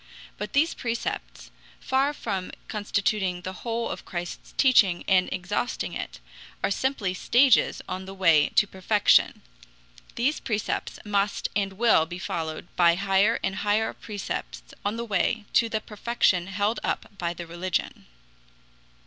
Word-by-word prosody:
But -, -, -6 dB
these 315 Hz, +4 st, +3 dB
precepts, 235 Hz, -1 st, -4 dB, 0.3 s
far 270 Hz, +2 st, +1 dB
from 195 Hz, -10 st, -4 dB, 0.2 s
constituting 200 Hz, -3 st, -1 dB
the 185 Hz, -, -5 dB
whole 230 Hz, 0 st, -2 dB
of -, -, -6 dB
Christ's 175 Hz, -2 st, -6 dB
teaching 200 Hz, -10 st, +4 dB
and 185 Hz, -1 st, +4 dB
exhausting 185 Hz, +6 st, -2 dB
it, -, -, -6 dB, 0.4 s
are -, -, +1 dB
simply 215 Hz, -4 st, 0 dB
stages 245 Hz, +6 st, +3 dB
on 185 Hz, +1 st, -5 dB
the 190 Hz, -, -8 dB
way 165 Hz, -6 st, +4 dB
to -, -, +6 dB
perfection. 200 Hz, +2 st, +2 dB, 0.7 s
These 270 Hz, +6 st, +1 dB
precepts 215 Hz, -4 st, -2 dB
must 205 Hz, 0 st, 0 dB
and 195 Hz, -2 st, 0 dB
will 200 Hz, -6 st, +4 dB
be 175 Hz, +1 st, -6 dB
followed 160 Hz, -3 st, -4 dB
by 170 Hz, -1 st, +5 dB
higher 200 Hz, +4 st, +2 dB
and 190 Hz, -, -1 dB
higher 210 Hz, +2 st, +1 dB
precepts 210 Hz, -3 st, -5 dB, 0.2 s
on 205 Hz, +3 st, -1 dB
the 235 Hz, -, -3 dB
way 210 Hz, +2 st, 0 dB
to 230 Hz, -, +4 dB
the 220 Hz, -, -1 dB
perfection 210 Hz, -5 st, +1 dB
held 205 Hz, +4 st, 0 dB
up -, -, -2 dB
by 170 Hz, 0 st, -2 dB
the 170 Hz, -, -6 dB
religion. 175 Hz, +2 st, -3 dB
200 Hz, 140 wpm, -26 LUFS, 185-230 Hz, 0.7 s, to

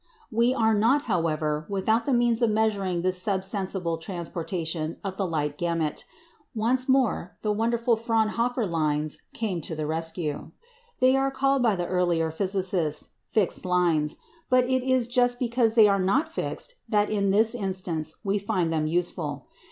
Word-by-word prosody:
We 235 Hz, +2 st, +3 dB
are 225 Hz, -3 st, +3 dB
not, 235 Hz, +8 st, +3 dB
however, 155 Hz, -6 st, -1 dB
without 220 Hz, +5 st, 0 dB
the -, -, +2 dB
means 240 Hz, -1 st, +2 dB
of 235 Hz, -, +4 dB
measuring 200 Hz, -5 st, 0 dB
this 185 Hz, 0 st, +1 dB
sub 190 Hz, 0 st, 0 dB
sensible 190 Hz, -4 st, -1 dB
transportation 165 Hz, -2 st, -4 dB
of 195 Hz, -2 st, -4 dB
the 195 Hz, -1 st, -1 dB
light 150 Hz, -3 st, -2 dB
gamut. 165 Hz, -3 st, -1 dB, 0.5 s
Once 250 Hz, +4 st, +2 dB
more 255 Hz, -9 st, +1 dB
the 210 Hz, -, +1 dB
wonderful 230 Hz, +2 st, +1 dB
Fraunhofer 230 Hz, +1 st, 0 dB
lines 155 Hz, -3 st, -1 dB
came 195 Hz, -7 st, -2 dB
to 160 Hz, -, -5 dB
the 155 Hz, -1 st, -3 dB
rescue. 160 Hz, -1 st, -3 dB, 0.5 s
They 255 Hz, +1 st, +5 dB
were 270 Hz, 0 st, +2 dB
called 270 Hz, 0 st, +1 dB
by 225 Hz, -4 st, +3 dB
the 175 Hz, -1 st, -2 dB
earlier 175 Hz, -3 st, +1 dB
physicists 185 Hz, -3 st, -1 dB, 0.2 s
"fixed 205 Hz, -5 st, 0 dB
lines;" 175 Hz, -5 st, +1 dB, 0.3 s
but 255 Hz, 0 st, +5 dB
it 260 Hz, 0 st, +1 dB
is 260 Hz, -2 st, +1 dB
just 245 Hz, 0 st, +2 dB
because 235 Hz, -2 st, +1 dB
they 220 Hz, -3 st, +8 dB
are 200 Hz, -1 st, +2 dB
not 280 Hz, -, +1 dB
fixed -, -, -4 dB
that, 210 Hz, -2 st, +2 dB
in 200 Hz, -2 st, +1 dB
this 220 Hz, +4 st, +3 dB
instance, 185 Hz, -7 st, -3 dB
we 200 Hz, 0 st, 0 dB
find 180 Hz, -4 st, -1 dB
them 155 Hz, -1 st, 0 dB
useful. 160 Hz, -4 st, -2 dB
195 Hz, 160 wpm, -26 LUFS, 165-230 Hz, 0.5 s, they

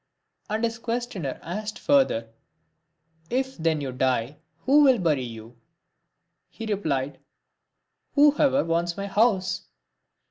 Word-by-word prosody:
And 220 Hz, +2 st, 0 dB
as 230 Hz, 0 st, -3 dB
his -, -, -21 dB
questioner 230 Hz, -, -3 dB
asked 210 Hz, +5 st, -5 dB
further, 260 Hz, -, +2 dB, 0.5 s
" 150 Hz, -, -52 dB, 0.2 s
If 265 Hz, +1 st, -1 dB
then 160 Hz, -2 st, 0 dB
you 135 Hz, -2 st, -3 dB
die, 130 Hz, +1 st, 0 dB, 0.3 s
who 285 Hz, +3 st, +6 dB
will 265 Hz, -3 st, +6 dB
bury 160 Hz, -, +1 dB
you?" 115 Hz, -1 st, -9 dB, 0.9 s
He 225 Hz, -, -8 dB
replied, 145 Hz, -10 st, -2 dB, 1.0 s
"Who 290 Hz, 0 st, +6 dB
ever 275 Hz, -1 st, +4 dB
wants 170 Hz, +1 st, -1 dB
my 200 Hz, -, -3 dB
house." 195 Hz, -3 st, +1 dB
185 Hz, 130 wpm, -25 LUFS, -, 1.0 s, who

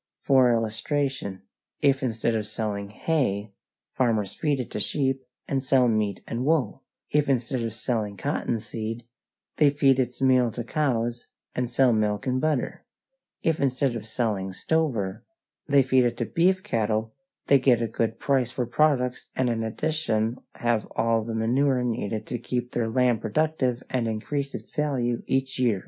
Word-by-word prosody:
For 130 Hz, -3 st, +4 dB
illustration: 115 Hz, -1 st, -1 dB, 0.4 s
if 140 Hz, -2 st, +3 dB
instead 115 Hz, -2 st, 0 dB
of 110 Hz, -2 st, -1 dB
selling 105 Hz, -2 st, -3 dB
hay, 105 Hz, -5 st, -1 dB, 0.4 s
farmers 110 Hz, -6 st, 0 dB
feed 145 Hz, -3 st, 0 dB
it 125 Hz, -, -4 dB
to -, -, -3 dB
sheep 135 Hz, -2 st, 0 dB, 0.3 s
and 135 Hz, -1 st, -1 dB
sell 130 Hz, -2 st, +4 dB
meat 105 Hz, -4 st, 0 dB
and 115 Hz, +2 st, -2 dB
wool; 135 Hz, -4 st, +1 dB, 0.3 s
if 150 Hz, -1 st, +2 dB
instead 125 Hz, -1 st, 0 dB
of 115 Hz, -1 st, -2 dB
selling 110 Hz, -2 st, -2 dB
cotton 120 Hz, -1 st, -1 dB
seed, 115 Hz, +1 st, -5 dB, 0.5 s
they 150 Hz, -2 st, +6 dB
feed 140 Hz, -2 st, +3 dB
its 125 Hz, -1 st, -1 dB
meal 130 Hz, -2 st, +4 dB
to 120 Hz, -, -4 dB
cows, 120 Hz, -3 st, -1 dB, 0.3 s
and 125 Hz, -1 st, -1 dB
sell 125 Hz, 0 st, +4 dB
milk 105 Hz, +1 st, 0 dB
and 130 Hz, 0 st, 0 dB
butter; 155 Hz, -5 st, -1 dB, 0.6 s
if 160 Hz, -1 st, +1 dB
instead 135 Hz, -1 st, +1 dB
of 110 Hz, -1 st, -6 dB
selling 105 Hz, -5 st, -1 dB
stover, 115 Hz, -8 st, -1 dB, 0.4 s
they 140 Hz, -2 st, +5 dB
feed 130 Hz, -1 st, +3 dB
it 120 Hz, 0 st, 0 dB
to 120 Hz, -, -1 dB
beef 185 Hz, +7 st, +2 dB
cattle, 110 Hz, -, -1 dB, 0.3 s
they 140 Hz, -, +5 dB
get 125 Hz, -3 st, +4 dB
a 115 Hz, -, 0 dB
good 110 Hz, +1 st, -1 dB
price 135 Hz, -4 st, +1 dB
for 125 Hz, 0 st, -2 dB
products 125 Hz, 0 st, +1 dB
and 125 Hz, -2 st, +1 dB
in 115 Hz, -1 st, -1 dB
addition 115 Hz, -2 st, -1 dB, 0.2 s
have 120 Hz, -2 st, 0 dB
all 115 Hz, 0 st, +2 dB
the 115 Hz, 0 st, -4 dB
manure 125 Hz, +3 st, +2 dB
needed 110 Hz, -3 st, -2 dB
to 120 Hz, -, -4 dB
keep 125 Hz, +1 st, -3 dB
their 115 Hz, -2 st, -1 dB
land 120 Hz, -1 st, +2 dB
productive 130 Hz, +1 st, 0 dB
and 125 Hz, -3 st, -1 dB
increase 140 Hz, +6 st, -3 dB
its -, -, -10 dB
value 130 Hz, -6 st, 0 dB
each 135 Hz, 0 st, 0 dB
year. 115 Hz, -6 st, +2 dB
120 Hz, 165 wpm, -26 LUFS, 110-135 Hz, 0.6 s, they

